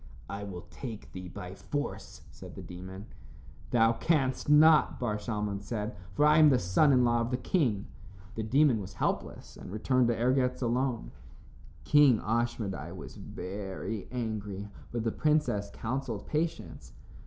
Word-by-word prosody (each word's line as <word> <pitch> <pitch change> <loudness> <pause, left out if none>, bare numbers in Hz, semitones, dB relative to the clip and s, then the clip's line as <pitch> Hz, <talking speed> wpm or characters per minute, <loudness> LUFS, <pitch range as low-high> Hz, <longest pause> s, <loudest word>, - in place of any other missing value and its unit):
"I 100 +1 -5
will 90 -4 -7
take 115 -5 -8
thee 90 -1 -7
by 90 0 -8
force," 145 +8 -5
said - - -11
the - - -8
demon. 95 +3 -9 0.6
"Thou 115 -1 +4
canst 135 -1 0
not," 155 +1 +6
Bar 110 -4 -1
Shalmon 105 -2 -3
said, 105 +2 -4 0.2
"for 150 - +4
I 150 +1 +6
am 155 -1 +8
the 130 - +4
son 95 - +3
in 125 -2 +5
law 120 0 +2
of 115 - -1
the 125 - 0
king." 125 - 0 0.5
The 110 - -3
demon 125 +1 +3
was 95 0 -8
helpless - - -3
and - - -10
returned 125 +4 +2
to 120 - +2
Ergetz 125 +2 +1
alone. 125 0 -1 0.7
King 145 -6 +5
Ashmedai 110 -6 -2
was 70 -6 -9
very 95 +2 -6
angry, 105 -4 -4 0.2
but 120 -2 -2
the 115 - 0
princess 150 -10 +1
counseled 120 -3 -4
patience. 80 - -3
115 Hz, 155 wpm, -30 LUFS, 100-130 Hz, 0.7 s, am